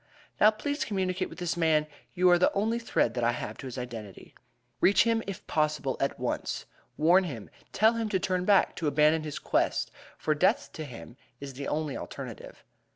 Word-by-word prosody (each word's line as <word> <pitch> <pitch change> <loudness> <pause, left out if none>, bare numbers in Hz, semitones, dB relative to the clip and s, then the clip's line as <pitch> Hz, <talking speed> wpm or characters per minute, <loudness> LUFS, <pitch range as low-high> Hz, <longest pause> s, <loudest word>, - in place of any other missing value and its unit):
"Now 210 - +8
please 285 +7 -2
communicate 185 -2 -2
with - - -11
this 175 -1 -2
man; 160 -3 +2 0.3
you 180 0 +3
are 175 - +5
the 180 - +4
only 220 +4 0
thread 170 - 0
that 120 - -2
I 120 +1 +3
have 110 -2 -5
to 135 - -7
his 130 - -7
identity. 115 -6 -8 0.5
"Reach 195 - +5
him, 230 -1 +1
if 195 -3 -6
possible, 150 -4 0
at 135 - -1
once. - - -3 0.3
Warn 175 +5 +5
him. 120 - -7 0.2
Tell 220 +2 +4
him 230 -2 -2
to 195 -3 +1
turn 185 -1 -1
back 200 +1 +3
to 165 - -1
abandon 150 +2 +3
his 150 -2 -5
quest, - - 0 0.3
for 155 - 0
death 190 - +1
to 155 - -6
him 120 -2 -11 0.2
is 140 -1 -7
the 140 +2 -6
only 150 -2 -2
alternative. - - -8
160 Hz, 195 wpm, -28 LUFS, 140-195 Hz, 0.5 s, Now